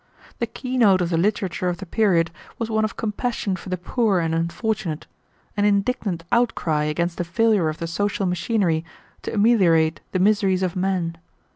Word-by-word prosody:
The 235 - 0
key 255 +3 -4
note 200 -5 +5
of 175 0 -1
the - - +2
literature 185 -1 0
of 175 - -3
the 195 - -8
period 175 -4 +2 0.3
was 230 -1 -3
one 220 0 +1
of 215 - -2
compassion 215 -2 -2
for 185 - -9
the 185 - -1
poor 205 +3 +1
and 165 -1 -1
unfortunate, 170 0 -2 0.5
and 205 - 0
indignant 200 -3 0
outcry 165 -10 +1
against 170 +3 -1
the - - +1
failure 200 -1 +2
of 155 - -5
the 170 - -4
social 200 +4 -1
machinery 180 -2 0 0.4
to - - -5
ameliorate 180 -8 +3
the - - 0
miseries 195 -1 +2
of 180 -2 -1
men. 180 -3 -1
190 Hz, 175 wpm, -23 LUFS, 170-215 Hz, 0.5 s, note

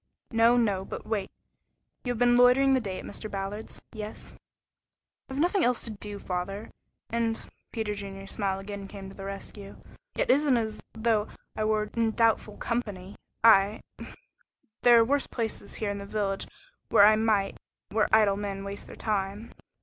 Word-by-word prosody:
"No, 230 +1 +5
no. 205 -5 +2
But - - -7
wait. 205 -3 -2 0.7
You 245 - -1
have 245 - -3
been 245 +1 +4
loitering 250 +2 +6
the 260 - +4
day 195 -6 -4
at - - -7
Mr. 215 +1 -6
Ballard's? 200 +2 -5
Yes." 215 -1 -7 0.9
"I - - -6
have 270 - -3
nothing 355 +4 +2
else 245 -1 +2
to 230 - -4
do, 205 -1 -6
father, 195 +3 -4 0.4
and 230 -1 0
" - - -48
Peter 220 -3 -2
Junior's 195 -1 -7
smile 195 -2 -1
again 200 0 -7
came 195 -1 -9
to - - -13
the 195 - -8
rescue. 195 0 -8 0.4
"It - - +2
isn't 285 -3 +4
as 220 -2 -2
though 220 -1 +1 0.3
I 215 - -1
were 215 -1 0
in 225 -1 +1
doubtful 225 -2 +2
company 205 -5 -3 0.3
I 210 -1 +6 1.0
there 240 -1 +7
are 230 - +5
worse 280 +3 +1
places 220 -3 -4
here 210 -2 -2
in 200 - -4
the 200 - -7
village 200 -2 -2 0.4
where 200 - +7
I 215 +1 +7
might 215 -3 +1 0.3
where 215 +1 +1
idle 210 -2 +5
men 200 -1 -4
waste 200 0 -7
their - - -10
time." 205 +1 -2
215 Hz, 175 wpm, -28 LUFS, 200-230 Hz, 1.0 s, there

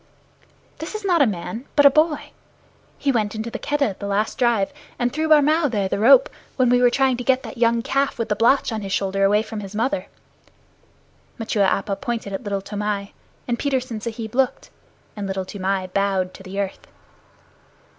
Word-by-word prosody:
"This 320 +7 -6
is 430 -1 -5
not 350 -5 +3
a 275 - +5
man, 215 +5 -5
but 290 - +5
a 280 - +9
boy. 305 +1 +1 0.7
He 280 - +1
went 215 -4 -1
into 220 +2 -4
the - - -5
Keddah 290 -3 0
at 195 - -9
the 200 - -4
last 205 +2 -1
drive, 235 -2 +2 0.2
and 245 0 -1
threw 315 +2 -1
Barmao 305 0 +4
there 205 -5 0
the 195 - -2
rope, 255 +4 +7 0.3
when 255 -2 +3
we 245 0 +4
were 245 - +6
trying 260 0 +2
to 245 - -4
get 260 +1 +2
that 250 - -9
young 230 -1 +2
calf 275 +2 0
with 230 - -2
the 210 - 0
blotch 240 +5 +3
on 220 -1 -3
his 195 -1 -6
shoulder 195 0 0
away 205 +2 +4
from 220 -1 -6
his 200 0 -8
mother." 270 +6 -1 1.3
Machua 215 -3 +1
Appa 195 +1 -1
pointed 235 -6 -4
at 195 - -3
Little 200 -2 -3
Toomai, 205 0 -3 0.3
and 240 -1 -1
Petersen 255 -5 -2
Sahib 225 -1 -5
looked, 270 - 0 0.4
and 205 -2 -4
Little 190 -1 -3
Toomai 190 0 -2
bowed 195 -2 0
to - - -12
the 190 +1 -6
earth. 195 -1 -4
225 Hz, 195 wpm, -22 LUFS, 200-265 Hz, 1.3 s, a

